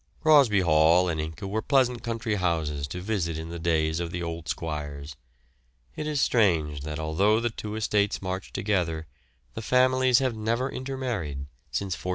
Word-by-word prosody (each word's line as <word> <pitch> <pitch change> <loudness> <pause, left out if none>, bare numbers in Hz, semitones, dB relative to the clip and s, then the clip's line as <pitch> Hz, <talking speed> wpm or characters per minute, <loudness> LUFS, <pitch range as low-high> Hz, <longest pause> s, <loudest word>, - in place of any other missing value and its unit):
Crosby 140 -11 +6
Hall 85 +2 +4
and 80 -3 -1
Ince 80 +1 -7
were 100 +3 -2
pleasant 125 -2 +2
country 115 -1 -2
houses 80 -7 -1
to 90 +5 -6
visit 90 -5 -2
in 80 +1 -6
the 85 0 -6
days 80 -1 +1
of 85 -1 -3
the 85 +1 -4
old 85 -1 -5
squires. 75 -3 -5 0.8
It 150 - -4
is 150 -2 -1
strange 80 - +2
that 75 +1 -5
although 90 +8 +2
the 120 0 -1
two 105 -1 -6
estates 105 -2 +1
march 95 0 -5
together 85 -6 -1 0.5
the 115 - -5
families 130 +1 +4
have 130 -3 +1
never 115 +4 -1
inter 135 +1 -5
married 85 - -3 0.2
since 95 +10 -2
1401. 90 - -6
95 Hz, 175 wpm, -26 LUFS, 80-115 Hz, 0.8 s, Crosby